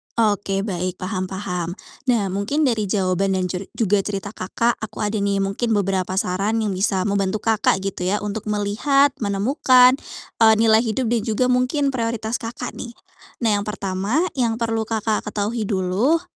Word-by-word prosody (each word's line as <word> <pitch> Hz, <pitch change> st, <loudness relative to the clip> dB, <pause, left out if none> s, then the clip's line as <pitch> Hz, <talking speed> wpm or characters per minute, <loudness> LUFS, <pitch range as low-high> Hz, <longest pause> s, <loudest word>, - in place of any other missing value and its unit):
Oke 205 Hz, -3 st, +1 dB
baik, 185 Hz, -3 st, -2 dB
paham 185 Hz, 0 st, -3 dB
paham. 180 Hz, -2 st, -4 dB, 0.3 s
Nah 220 Hz, -6 st, +2 dB
mungkin 200 Hz, +11 st, -1 dB
dari 225 Hz, -6 st, +1 dB
jawaban 190 Hz, 0 st, +1 dB
dan 185 Hz, -1 st, -1 dB
jur 185 Hz, +2 st, -4 dB
juga 205 Hz, -2 st, +2 dB
cerita 195 Hz, 0 st, -3 dB
Kakak, 230 Hz, +4 st, -1 dB
aku 220 Hz, -1 st, -6 dB
ada 210 Hz, +1 st, -1 dB
nih 200 Hz, -1 st, 0 dB
mungkin 215 Hz, +4 st, -1 dB
beberapa 190 Hz, -2 st, 0 dB
saran 195 Hz, +4 st, 0 dB
yang 210 Hz, -, -1 dB
bisa 190 Hz, 0 st, 0 dB
membantu 200 Hz, 0 st, -1 dB
Kakak 215 Hz, -3 st, +2 dB
gitu 195 Hz, -2 st, -3 dB
ya, 205 Hz, +3 st, 0 dB
untuk 210 Hz, +1 st, -4 dB
melihat, 215 Hz, +8 st, +2 dB
menemukan, 250 Hz, +5 st, +4 dB, 0.4 s
eee, 220 Hz, -1 st, +7 dB
nilai 220 Hz, 0 st, +4 dB
hidup 225 Hz, +1 st, -1 dB
dan 235 Hz, -2 st, +1 dB
juga 220 Hz, +2 st, +1 dB
mungkin 255 Hz, +3 st, +1 dB
prioritas 230 Hz, -2 st, -2 dB
Kakak 240 Hz, +1 st, -6 dB
nih. 235 Hz, -1 st, -7 dB, 0.5 s
Nah, 215 Hz, -3 st, +3 dB
yang 205 Hz, -, -4 dB
pertama 200 Hz, -, -1 dB, 0.2 s
yang 235 Hz, -2 st, +2 dB
perlu 225 Hz, -1 st, -1 dB
Kakak 220 Hz, -1 st, -1 dB
ketahui 210 Hz, +1 st, -2 dB
dulu, 200 Hz, -, +1 dB
210 Hz, 165 wpm, -21 LUFS, 195-230 Hz, 0.5 s, eee